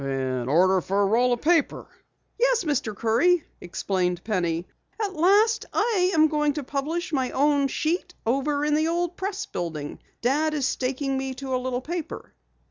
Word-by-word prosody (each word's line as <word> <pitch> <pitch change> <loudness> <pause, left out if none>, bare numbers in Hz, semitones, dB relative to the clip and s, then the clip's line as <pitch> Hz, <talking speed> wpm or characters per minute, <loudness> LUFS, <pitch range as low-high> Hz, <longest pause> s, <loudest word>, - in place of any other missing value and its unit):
"An 130 -2 -2
order 185 +5 +4
for 195 +3 0
a - - +3
roll 240 +5 +3
of 240 - 0
paper?" 330 -1 +2 0.5
"Yes, - - +3
Mr. 285 -9 -1
Curry," 275 - +2 0.2
explained 180 0 -2
Penny. 175 -5 -1 0.3
"At 410 -3 -2
last 410 +7 +3
I 415 -5 +2
am 315 0 +6
going 300 -1 +1
to 295 0 -4
publish 310 +6 -3
my 260 -3 +1
own 285 0 +2
sheet 350 +5 -2
over 285 +5 0
in 300 - +1
the 310 +1 +2
old 345 +1 -1
Press 395 +3 -3
building. 155 - -5 0.2
Dad 300 +5 +1
is 280 -3 0
staking 270 +1 -1
me 265 0 -4
to 265 0 -5
a 255 - 0
little 255 0 -2
paper." 335 +3 -6
275 Hz, 170 wpm, -25 LUFS, 220-335 Hz, 0.5 s, am